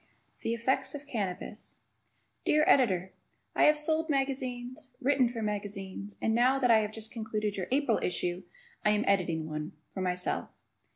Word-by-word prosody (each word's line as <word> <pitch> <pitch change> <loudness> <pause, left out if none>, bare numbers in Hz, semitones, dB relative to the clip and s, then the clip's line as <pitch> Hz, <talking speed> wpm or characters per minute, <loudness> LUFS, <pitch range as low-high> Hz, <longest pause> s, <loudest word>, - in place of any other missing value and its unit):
The 230 - 0
Effects 265 +3 0
of 290 0 -7
Cannabis 210 -4 -4 0.7
Dear 305 0 +4
Editor: 190 -8 +3 0.4
I - - +4
have 300 0 +6
sold 315 +2 +1
magazines, 260 -3 -2
written 265 -2 +3
for 230 -2 -4
magazines, 200 -1 -4
and, 220 - +2
now 250 +3 +4
that 250 -3 +3
I 225 - +7
have 210 -1 -1
just 220 0 -5
concluded 215 -2 -2
your 185 -2 -3
April 265 -4 +2
issue, 180 0 -1 0.4
I - - +4
am 210 +1 +1
editing 170 -5 +1
one 155 0 -4 0.2
for 190 - -3
myself. 180 -1 -1
225 Hz, 160 wpm, -30 LUFS, 195-265 Hz, 0.7 s, I